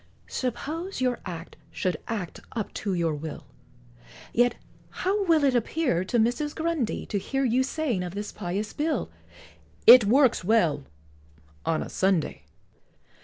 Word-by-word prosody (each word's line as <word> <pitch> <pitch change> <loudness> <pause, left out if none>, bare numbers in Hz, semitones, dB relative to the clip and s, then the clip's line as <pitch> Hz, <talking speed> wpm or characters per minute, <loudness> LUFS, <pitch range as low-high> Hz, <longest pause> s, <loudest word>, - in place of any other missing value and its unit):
Suppose 315 - -4
your 250 -1 0
Act 170 -1 -7
should 180 -4 -2
act 205 -7 -4
up 220 -4 -4
to 200 -3 -2
your 165 -2 +1
will, 150 +1 -6 0.9
Yet 245 +1 +3 0.3
how 400 +2 0
will 325 -4 +4
it 275 -2 +4
appear 240 - +1
to 240 - 0
Mrs. 245 +6 +1
Grundy, 320 -7 -1
To 205 - -2
hear 270 +7 -1
you 250 +1 +3
saying 265 - -1
of 180 +1 -5
this 205 +1 -4
pious 200 +2 -4
bill, 305 +1 -1 0.7
"It 245 -3 +10
works 255 0 +4
well 170 -9 +2 0.8
on 165 -1 +1
a - - -8
Sunday!" 190 -5 0
230 Hz, 140 wpm, -26 LUFS, 185-280 Hz, 0.9 s, It